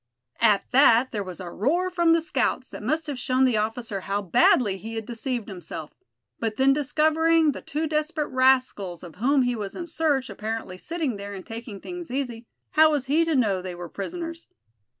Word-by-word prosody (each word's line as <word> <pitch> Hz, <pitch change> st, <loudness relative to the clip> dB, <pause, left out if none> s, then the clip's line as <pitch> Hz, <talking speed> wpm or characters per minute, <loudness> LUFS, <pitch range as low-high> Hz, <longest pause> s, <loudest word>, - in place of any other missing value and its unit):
At 215 Hz, -4 st, +4 dB
that 255 Hz, -1 st, +5 dB
there 205 Hz, -2 st, -2 dB
was 185 Hz, -1 st, -8 dB
a 180 Hz, -2 st, -7 dB
roar 345 Hz, -, 0 dB
from 345 Hz, -2 st, +3 dB
the 330 Hz, -, +3 dB
scouts -, -, -1 dB
that -, -, -8 dB
must 315 Hz, +1 st, -1 dB
have 285 Hz, -5 st, -4 dB
shown 255 Hz, +1 st, +2 dB
the 245 Hz, -4 st, +2 dB
officer 215 Hz, -1 st, -2 dB
how 200 Hz, +2 st, -1 dB
badly 205 Hz, +1 st, +4 dB
he 225 Hz, +4 st, -7 dB
had 225 Hz, -1 st, -4 dB
deceived 240 Hz, 0 st, -3 dB
himself; 165 Hz, -5 st, -7 dB, 0.5 s
but 225 Hz, -2 st, -2 dB
then 270 Hz, +1 st, +5 dB
discovering 315 Hz, +2 st, +3 dB
the -, -, -7 dB
two 305 Hz, +3 st, -3 dB
desperate 305 Hz, 0 st, -1 dB
rascals 255 Hz, -9 st, +2 dB
of 175 Hz, -1 st, -11 dB
whom 265 Hz, +5 st, +3 dB
he 245 Hz, 0 st, 0 dB
was 205 Hz, -3 st, -5 dB
in 350 Hz, -, -5 dB
search, 300 Hz, -5 st, 0 dB
apparently 215 Hz, -3 st, -5 dB
sitting 315 Hz, -, -3 dB
there, 200 Hz, 0 st, -7 dB
and 190 Hz, -, -9 dB
taking 225 Hz, -2 st, -7 dB
things 355 Hz, -, -7 dB
easy, 245 Hz, -3 st, -4 dB, 0.2 s
how 315 Hz, 0 st, +6 dB
was 290 Hz, -4 st, 0 dB
he 300 Hz, +5 st, +3 dB
to 325 Hz, -2 st, 0 dB
know 205 Hz, -8 st, +2 dB
they 180 Hz, -1 st, -6 dB
were 175 Hz, -1 st, -7 dB
prisoners. 330 Hz, -, -6 dB
250 Hz, 195 wpm, -25 LUFS, 205-305 Hz, 0.5 s, how